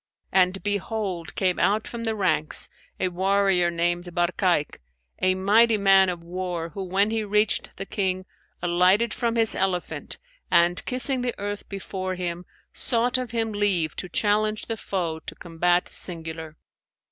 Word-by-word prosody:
And 190 0 +2
behold 205 -5 -3
came 185 -2 +1
out 215 +2 +2
from 235 -1 -5
the 225 -1 0
ranks 155 -7 +2 0.3
a 185 - +1
warrior 190 -1 +2
named 175 +1 0
Barkayk, 175 -2 +1 0.4
a 185 0 +3
mighty 215 +4 +4
man 195 -1 +5
of 175 -2 -5
war 175 -1 -4
who, 195 - -7
when 195 +3 +1
he 225 -1 0
reached 210 +1 +1
the 195 - -4
King, 185 -2 -2 0.4
alighted 185 +6 +3
from 235 -1 -1
his 225 -1 +3
elephant 185 -2 -2 0.3
and 170 +1 +3
kissing 255 +1 +1
the 245 -1 -2
earth 205 0 -5
before 185 -1 -4
him, 175 -1 -4 0.3
sought 245 +2 +1
of 250 -2 -4
him 225 -1 -1
leave 190 -7 0
to 180 - -4
challenge 215 +3 0
the 225 - -3
foe 175 -6 -3
to - - -9
combat 175 +1 0
singular. 160 -2 -5
190 Hz, 150 wpm, -25 LUFS, 175-210 Hz, 0.4 s, man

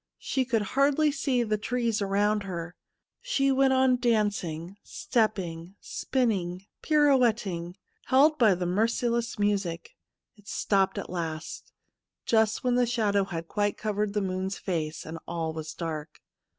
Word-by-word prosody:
She 260 -1 -1
could 230 -4 +1
hardly 285 +2 +3
see 260 -4 0
the 215 -2 -1
trees 235 -1 -1
around 205 +2 +1
her. 175 -3 -6 0.5
She 275 - +1
went 270 0 +3
on 260 -1 +4
dancing, 205 -7 -1
stepping, 190 -6 -2
spinning, 195 -8 -1 0.2
pirouetting, 235 - +2 0.3
held 300 +4 +4
by 215 -6 +5
the 180 0 -3
merciless 230 +5 0
music. 195 -5 -1 0.5
It 205 -1 -21
stopped 195 -2 +1
at - - -5
last, 160 -3 -5 0.5
j 230 - +2
ust 220 0 +2
when 250 -1 +2
the 245 0 +3
shadow 210 -4 +1
had 165 -3 -5
quite 205 +1 -1
covered 210 -1 -2
the 210 - +2
moon's 190 0 -2
face, 160 -4 -3
and 165 +1 -7
all 165 -2 -3
was 160 -1 -6
dark. 155 -2 -5
205 Hz, 140 wpm, -27 LUFS, 175-245 Hz, 0.5 s, by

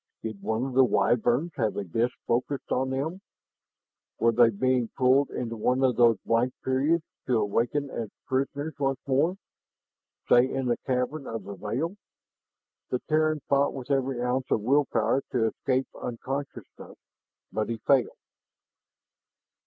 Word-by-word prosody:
Did 110 -3 -5
one 110 +2 -1
of 135 - -5
the 130 +1 +6
Wyverns 125 +5 +2
have 110 -5 0
a 100 - -1
disk 115 +7 -1
focused 130 +4 -1
on 130 +1 +1
them? 150 +8 -3 1.0
Were 115 - +3
they 115 0 +5
being 125 +2 +1
pulled 130 +2 +4
into 115 -2 -4
one 125 +4 +1
of 130 -2 +3
those 115 -1 +5
blank 120 +2 +1
periods, 145 +6 +1 0.2
to 125 -3 +3
awaken 120 +7 0
as 115 -3 -4 0.2
prisoners 140 +3 -2
once 135 -1 +1
more 145 +7 +1 0.9
say, 125 +2 +5
in 135 -1 -2
the 120 -1 +1
cavern 130 +3 -1
of 115 -3 -5
the 100 +2 -7
veil? 120 - -3 0.9
The 125 - 0
Terran 155 -1 +2
fought 140 0 +2
with 135 +1 -6
every 135 -2 0
ounce 130 +1 -1
of - - +1
will 140 +6 +3
power 115 +4 +1
to 120 -3 +2
escape 130 +4 0
unconsciousness, 135 +4 -6 0.5
but 110 +1 -2
he 115 - -2
failed. 135 -3 +3
130 Hz, 150 wpm, -27 LUFS, 115-140 Hz, 1.0 s, the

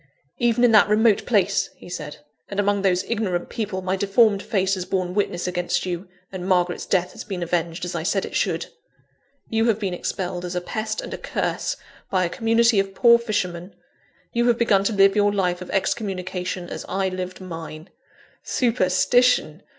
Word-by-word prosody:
"Even 240 0 +2
in 245 - +6
that 210 -2 +6
remote 215 0 +3
place," 205 -6 +2
he - - -13
said, 155 -4 -6 0.3
"and 200 - -3
among 205 0 +2
those 185 -1 +2
ignorant 200 -7 -2
people, 205 -5 -3
my 185 +1 0
deformed 200 +1 +3
face 195 -4 0
has 185 -2 -2
borne 180 -1 -2
witness 185 -3 -1
against 180 0 -1
you, 180 +1 -4 0.2
and 185 -1 -5
Margaret's 180 -2 +1
death 180 -2 +1
has - - -8
been 190 -4 -4
avenged, 170 0 -2
as 175 - -5
I 170 - -2
said 190 +4 0
it - - -9
should. - - 0 0.9
You 225 0 +2
have 225 -3 +2
been 195 -4 -3
expelled 180 0 -3
as 180 0 -5
a - - +1
pest 215 +4 -3
and - - -7
a - - -5
curse, - - -2 0.3
by 185 -1 +2
a - - -2
community 230 +1 +3
of 195 0 -2
poor 235 +2 +6
fishermen; 185 -5 -3 0.6
you 240 +1 +2
have 240 -1 +3
begun 210 -5 +3
to 220 - +1
live 195 0 +5
your 205 -1 +3
life 180 -3 0
of 180 - -8
excommunication, 185 -3 -2
as - - -6
I 190 +1 0
lived 185 0 -5
mine. 165 -3 -8 0.5
Superstition! 235 - +2
195 Hz, 185 wpm, -23 LUFS, 180-215 Hz, 0.9 s, in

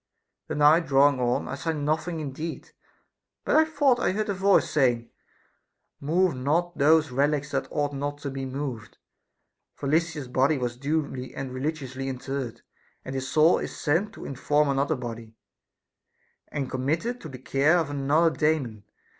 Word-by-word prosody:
The - - -3
night 155 +3 +5
draw 140 +1 +6
ing 130 - -6
on, 120 0 0
I - - -5
saw 160 +4 -2
nothing 155 +3 -1
indeed, 155 +3 -6 0.7
but 315 0 +4
thought 285 -5 +2
I 185 - +1
heard 215 +1 -2
a - - +1
voice 195 +1 +3
saying: 120 -5 +1 0.9
Move 170 +4 +2
not 160 +7 0
those 155 +1 +4
relics 145 +2 0
that 135 0 -1
ought 145 -1 -1
not 145 +1 -3
to 140 - -3
be 135 0 -5
moved, 130 -5 -5 0.8
for 140 - -5
Lysis's 155 -2 0
body 135 +4 +2
was 120 -2 -2
duly 140 -1 -3
and 135 -2 -5
religiously 135 -1 -4
interred; 130 -1 -5 0.4
and 130 - -5
his 130 -1 -3
soul 155 +5 +4
is - - -6
sent 170 +7 0
to - - -10
inform 145 +2 +1
another 140 +3 +1
body, 115 -3 -7 1.1
and 140 -2 -3
committed 160 - -1
to 160 - -8
the 130 - -8
care 140 +6 +2
of 160 -4 -1
another 145 +4 +2
Daemon. 140 -9 0
145 Hz, 160 wpm, -26 LUFS, 130-160 Hz, 1.1 s, draw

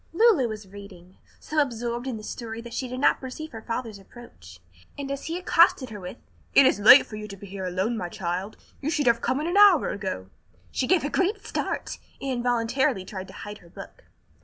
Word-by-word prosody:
Lulu 370 - +4
was 215 -3 -7
reading, 190 -2 -13 0.2
so 310 - -2
absorbed 240 -1 -3
in 250 -4 -3
the 215 - -10
story 225 0 -6
that 235 0 -10
she 260 - -3
did 255 +1 -5
not 285 - +3
perceive 290 +4 -7
her 225 - -8
father's 230 -2 -5
approach, 95 - -14 0.4
and 275 -1 -5
as 275 - -5
he 330 +2 -3
accosted 335 -8 +3
her 210 - -7
with, 180 +5 -8 0.4
"It 275 - +8
is 205 - +3
late 235 +7 +9
for 215 - -9
you 210 0 -7
to 200 -1 -9
be 200 - -11
here 195 -1 -6
alone, 190 +6 -1
my 180 -4 -4
child, 185 +1 -4 0.2
you 285 - -2
should 300 -3 0
have 235 -1 +3
come 255 +3 0
in - - -3
an 350 +4 0
hour 405 -6 +7
ago," 145 - -5 0.4
she 255 - -1
gave 370 -2 +3
a 290 - -1
great 400 +3 0
start, - - -3 0.2
and 275 - -3
involuntarily 245 -2 0
tried 190 -1 -7
to - - -13
hide 210 0 -8
her 170 - -18
book. - - -12
235 Hz, 220 wpm, -26 LUFS, 200-275 Hz, 0.4 s, late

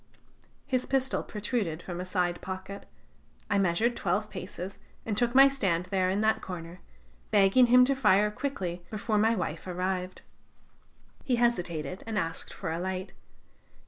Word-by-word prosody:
"His 255 -2 -1
pistol 265 -1 0
protruded 205 -6 -3
from 175 -1 -5
a - - -5
side 180 -2 -1
pocket. 190 +1 -7 0.6
I 200 - +3
measured 195 +6 +2
twelve 205 +2 -1
paces 185 0 -7 0.3
and 220 - -1
took 240 +3 0
my 270 +1 +9
stand 190 -11 0
there 185 -1 +2
in 195 +3 0
that 220 0 +2
corner, 175 -1 -7 0.5
begging 205 +5 +5
him 250 +1 +7
to 275 - +2
fire 210 -5 +3
quickly, 185 -9 -4
before 215 0 -1
my 225 +2 +3
wife 165 -3 -4
arrived. 185 0 -3 1.0
He 255 - +1
hesitated, 180 -8 -1
and 220 -2 -2
asked 165 -4 -2
for 160 - -5
a 165 - -2
light. 185 +1 -4
195 Hz, 150 wpm, -29 LUFS, 180-230 Hz, 1.0 s, my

